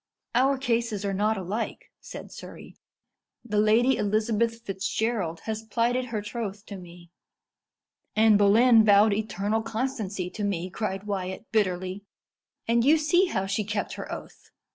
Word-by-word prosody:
"Our 265 +3 +3
cases 230 -5 -1
are 200 - -1
not 210 +3 +1
alike," 195 +5 -4
said - - -10
Surrey. - - -11 0.7
"The 210 -3 0
Lady 225 +5 +4
Elizabeth 220 +2 0
Fitzgerald 195 -3 -2
has 220 -1 -4
plighted 235 +3 0
her 220 -4 -4
troth 210 -2 -5
to 200 - -8
me." 175 -1 -13 1.0
"Anne 215 0 +5
Boleyn 220 +3 +6
vowed 205 0 +5
eternal 215 +1 -1
constancy 220 -6 -3
to 210 - -5
me," 185 -3 -2
cried 195 -1 -3
Wyat 190 -1 -4
bitterly; 185 -3 0 0.7
"and 230 0 +3
you 300 +5 +5
see 320 +5 +3
how 190 - -1
she 200 +2 -1
kept 205 0 -3
her - - -7
oath. - - -9
215 Hz, 140 wpm, -26 LUFS, 195-230 Hz, 1.0 s, Boleyn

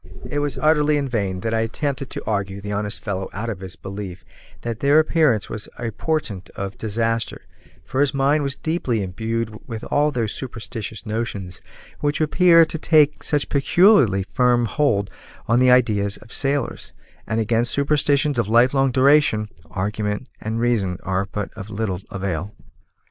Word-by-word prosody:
It 145 - -2
was 145 -1 -1
utterly 150 -1 +3
in 140 -1 -1
vain 100 -7 -2
that 115 +2 -2
I 115 - +2
attempted 130 +4 -2
to - - -7
argue 100 -2 -2
the 105 +1 -6
honest 105 +1 -2
fellow 95 -3 -3
out 115 +3 -3
of 100 - -6
his 95 -1 -8
belief 95 -1 -7 0.4
that 115 -1 -4
their 140 +2 +4
appearance 155 -8 +3
was 110 -1 -6
a 115 -1 -3
portent 105 - -3
of 100 0 -5
disaster, 115 +1 -2 0.4
for 130 - -1
his 145 -2 +3
mind 140 +3 +2
was 140 -2 -1
deeply 135 - -1
imbued 110 +4 -3
with 115 -3 -6
all 145 +1 +3
those 115 -7 -2
superstitious 115 -3 -6
notions 105 -6 -4 0.4
which 145 0 0
appear 165 +2 +5
to 160 - -4
take 150 -2 +4
such 145 -2 0
peculiarly 140 - +4
firm 120 +3 +2
hold 105 -7 0 0.4
on 115 +2 +3
the 130 0 +5
ideas 105 -5 +3
of 110 - -14
sailors; 140 -1 -2 0.3
and 110 0 0
against 115 +2 +1
superstitions 145 -1 +2
of 115 - +1
lifelong 130 +4 +4
duration, 130 -5 +3 0.2
argument 105 +5 -3
and 110 +1 -3
reason 110 -7 +1
are 95 0 0
of 100 - -7
but 105 0 -5
little 105 -3 -3
avail. 95 -1 -3
115 Hz, 165 wpm, -22 LUFS, 100-140 Hz, 0.4 s, appear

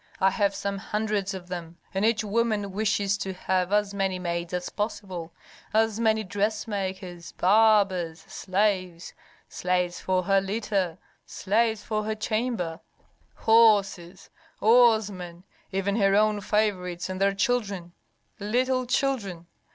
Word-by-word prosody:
I 190 0 +4
have 200 -1 +1
some 200 0 -3
hundreds 210 -1 -2
of 180 -2 -8
them, 170 -2 -7 0.2
and 195 +1 -1
each 225 0 +2
woman 215 -1 0
wishes 200 -1 0
to 190 - -3
have 185 0 -1
as 205 -1 +1
many 195 -2 -1
maids 170 -1 -3
as 180 0 -3
possible, 190 -5 -4 0.4
as 220 0 +2
many 220 -1 +2
dressmakers, 190 -3 -3
barbers, 195 -4 +3
slaves, 185 -3 -2 0.3
slaves 180 -1 -1
for 185 -1 0
her 195 +1 +3
litter, 195 -4 -2 0.3
slaves 220 +2 0
for 215 -1 -2
her 220 0 -2
chamber, 215 -6 -2 0.6
horses, 200 -5 +3 0.3
oarsmen, 210 -7 +3 0.3
even 195 +1 -1
her 195 -2 +3
own 210 0 +3
favorites 185 -4 -1
and 185 0 -5
their 200 0 +3
children 200 -5 -1 0.5
Little 255 +4 0
children! 215 -11 -1
200 Hz, 125 wpm, -26 LUFS, 185-215 Hz, 0.6 s, I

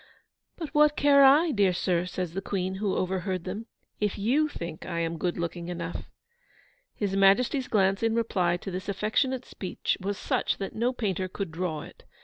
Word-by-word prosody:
'But 320 -4 -6
what 300 0 +5
care 280 -1 +6
I, 300 +5 +6
dear 200 -6 +3
sir,' 175 0 0
says 180 -2 -4
the 195 - -3
Queen, 190 -1 -2
who 200 -3 0
overheard 185 -1 -1
them, 205 +5 -5 0.3
'if 210 -2 0
YOU 260 +10 +2
think 170 - -7
I - - -4
am 165 0 -2
good 175 +1 -1
looking 170 0 -4
enough?' 175 -1 -5 0.9
His 200 -2 -1
Majesty's 240 +8 +3
glance 195 -2 +2
in 225 0 +1
reply 185 -7 +1
to 190 - -7
this 185 +2 -5
affectionate 240 +6 0
speech 185 - -3
was 200 +1 -2
such - - 0
that 195 - -5
no 235 +3 +1
painter 195 -7 -2
could 190 -1 -5
draw 160 -2 -3
it. - - -14
195 Hz, 180 wpm, -27 LUFS, 180-230 Hz, 0.9 s, care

